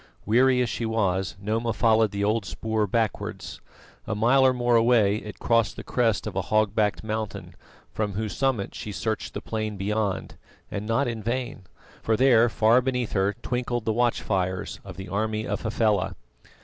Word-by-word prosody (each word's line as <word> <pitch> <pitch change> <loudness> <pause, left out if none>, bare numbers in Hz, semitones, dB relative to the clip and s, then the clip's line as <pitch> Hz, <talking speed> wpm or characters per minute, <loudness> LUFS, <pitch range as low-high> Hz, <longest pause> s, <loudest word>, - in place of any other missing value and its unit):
Weary 125 +3 +4
as 120 - -2
she - - -3
was, 95 -4 0
Noma 110 +3 -1
followed 110 0 +3
the 100 +1 -3
old 105 +1 +1
spoor 110 +3 -2
backwards. 110 0 -2 0.5
A 110 - -1
mile 120 +6 +4
or 130 - +6
more 120 -1 +1
away 115 -3 +4
it 105 -2 -8
crossed 115 -3 +1
the - - -8
crest 115 -4 0
of - - -5
a - - +1
hog 110 -2 +1
backed 105 -1 0
mountain, 110 -1 -4 0.4
from 105 -2 -2
whose 105 +1 -3
summit 130 -7 0
she 105 - -6
searched 110 +1 -3
the - - -3
plain 110 -2 -3
beyond, 100 0 -2 0.3
and 105 +1 -4
not 115 +5 +1
in 115 -2 -3
vain, 120 -1 -3 0.4
for 110 -1 +1
there 120 -2 +5
far 115 +3 +4
beneath 125 -2 -1
her 100 +1 +1
twinkled 120 -2 -2
the 110 - +1
watch 120 +1 +1
fires 95 -2 -2
of - - -10
the 95 - -7
army 110 +2 -1
of - - -3
Hafela. 105 -4 0
110 Hz, 180 wpm, -25 LUFS, 105-120 Hz, 0.5 s, or